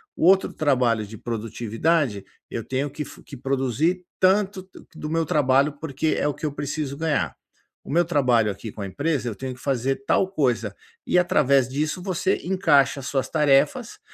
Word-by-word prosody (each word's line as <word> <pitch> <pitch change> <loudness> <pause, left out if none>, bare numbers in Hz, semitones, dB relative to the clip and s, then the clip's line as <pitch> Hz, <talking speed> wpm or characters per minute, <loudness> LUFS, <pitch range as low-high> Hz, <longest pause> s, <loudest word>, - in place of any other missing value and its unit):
"O - - 0
outro 190 +2 +4
trabalho 125 -7 +1
de 110 +2 -10
produtividade, 115 - -1 0.3
eu - - -3
tenho 135 +2 -2
que 150 +2 -5
fo - - -13
que - - -10
produzir 135 +7 0
tanto 190 0 +2 0.3
do 150 - -6
meu 165 0 0
trabalho, 140 -3 +3
porque 155 0 -1
é - - 0
o 145 - 0
que 145 - -7
eu 150 - -2
preciso 145 0 -3
ganhar. 155 -3 -1 0.5
O - - -9
meu 170 +3 +3
trabalho 125 -9 +2
aqui 105 +3 -8
com 105 - -9
a 100 - -3
empresa, 145 - -1
eu 110 - -6
tenho 130 +1 -5
que - - -18
fazer 135 0 -1
tal 190 - +3
coisa". 125 - 0 0.3
E, 180 - +4
através 140 -7 +3
disso, 150 +6 -2
você 190 0 0
encaixa 150 -7 +3
as 130 - -7
suas 135 -2 -1
tarefas, 145 -3 +2
140 Hz, 185 wpm, -24 LUFS, 125-160 Hz, 0.5 s, outro